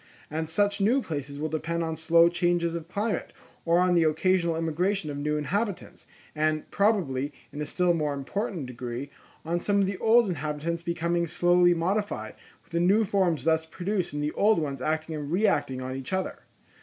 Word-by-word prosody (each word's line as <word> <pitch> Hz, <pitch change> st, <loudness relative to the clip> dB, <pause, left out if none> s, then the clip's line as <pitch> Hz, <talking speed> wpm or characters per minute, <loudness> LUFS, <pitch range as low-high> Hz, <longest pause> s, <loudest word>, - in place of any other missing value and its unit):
And 160 Hz, +1 st, -3 dB
such 200 Hz, +4 st, +1 dB
new 230 Hz, +7 st, +4 dB
places 145 Hz, -, -5 dB
will 155 Hz, +2 st, -2 dB
depend 165 Hz, +2 st, -2 dB
on 160 Hz, -1 st, -2 dB
slow 165 Hz, +1 st, +5 dB
changes 175 Hz, -1 st, +1 dB
of 165 Hz, -1 st, -5 dB
climate, 205 Hz, +1 st, -2 dB, 0.3 s
or 170 Hz, 0 st, +3 dB
on 180 Hz, 0 st, +3 dB
the 170 Hz, -, +4 dB
occasional 170 Hz, +2 st, +2 dB
immigration 165 Hz, +1 st, -1 dB
of 140 Hz, -, -5 dB
new 150 Hz, +1 st, 0 dB
inhabitants, 195 Hz, +7 st, -3 dB, 0.3 s
and, 155 Hz, 0 st, 0 dB
probably, 160 Hz, -10 st, +1 dB, 0.2 s
in 145 Hz, -, -5 dB
a 150 Hz, -, -3 dB
still 180 Hz, -1 st, +2 dB
more 150 Hz, -3 st, -1 dB
important 170 Hz, -, -3 dB
degree, 125 Hz, +2 st, -6 dB, 0.3 s
on 170 Hz, +2 st, 0 dB
some 200 Hz, +3 st, +1 dB
of 200 Hz, -, +3 dB
the 190 Hz, -1 st, -3 dB
old 230 Hz, 0 st, +5 dB
inhabitants 155 Hz, 0 st, -3 dB
becoming 170 Hz, 0 st, -1 dB
slowly 175 Hz, +1 st, +4 dB
modified, 170 Hz, -, -1 dB, 0.3 s
with -, -, -29 dB
the 170 Hz, -, 0 dB
new 195 Hz, +6 st, +4 dB
forms 185 Hz, -5 st, +1 dB
thus 160 Hz, 0 st, +2 dB
produced 185 Hz, +3 st, -2 dB
and 145 Hz, 0 st, -3 dB
the 150 Hz, -, 0 dB
old 210 Hz, +4 st, +3 dB
ones 140 Hz, -5 st, -2 dB
acting 155 Hz, +2 st, -1 dB
and 150 Hz, -1 st, -5 dB
reacting 175 Hz, -9 st, +1 dB
on 130 Hz, 0 st, -4 dB
each 135 Hz, +6 st, -6 dB
other. 190 Hz, 0 st, -2 dB
170 Hz, 185 wpm, -27 LUFS, 150-185 Hz, 0.3 s, slow